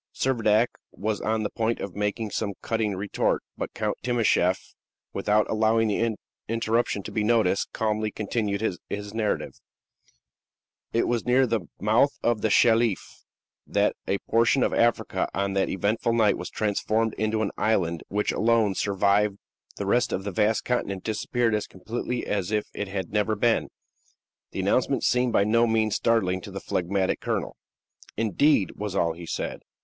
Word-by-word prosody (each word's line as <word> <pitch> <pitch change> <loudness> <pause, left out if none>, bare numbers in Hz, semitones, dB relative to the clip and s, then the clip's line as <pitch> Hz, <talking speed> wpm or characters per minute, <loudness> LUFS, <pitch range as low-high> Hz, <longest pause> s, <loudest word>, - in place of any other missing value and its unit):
Servadac 115 -3 +3 0.3
was 105 +1 -3
on 110 0 0
the 105 - -2
point 115 +1 -1
of 95 -3 -6
making 105 +1 -2
some 100 0 -2
cutting 110 -3 -1
retort, 100 +2 -1
but - - -4
Count - - -1
Timascheff, 110 -6 +1 0.4
without 105 +2 +2
allowing 110 0 +2
the 110 +1 0 0.3
interruption 115 -2 0
to - - -7
be 110 - 0
noticed, 110 -4 +2
calmly 110 0 -1
continued 105 -1 -2
his 105 0 -4
narrative: 110 -2 -2 1.3
"It 115 - +1
was 120 -1 0
near 130 +2 +4
the 115 -6 -2
mouth 110 +7 +3
of 115 -3 +1
the 110 - +1
Shelif 115 -1 +2 0.4
that - - +1
a 100 - +1
portion 115 +3 +3
of - - +1
Africa, 120 0 +1
on 100 +1 0
that 95 -1 +1
eventful 105 +5 0
night, 110 -3 +3
was 90 - -6
transformed 110 +1 0
into 110 0 0
an 100 - -1
island 85 -7 0
which 105 +1 0
alone 110 -2 +2
survived; 100 +1 +1 0.4
the 100 - -4
rest 120 +5 +2
of 95 - -2
the 100 - -3
vast 110 +2 +1
continent 100 -6 -1
disappeared 115 +1 0
as 105 -1 -1
completely 120 +5 -4
as 100 -3 -1
if 105 -1 0
it 105 - -4
had 95 -1 -5
never 105 +1 +1
been." 115 +2 +1 0.8
The - - -4
announcement - - +1
seemed 125 -1 +2
by - - +4
no 115 +3 +3
means 110 -2 +1
startling 95 -6 +1
to - - -9
the - - -6
phlegmatic 95 +1 -1
colonel. - - -2 0.6
"Indeed!" 110 - +2
was 105 -2 -4
all 85 -3 +1
he 85 0 -10
said. - - -4
110 Hz, 160 wpm, -26 LUFS, 100-115 Hz, 1.3 s, near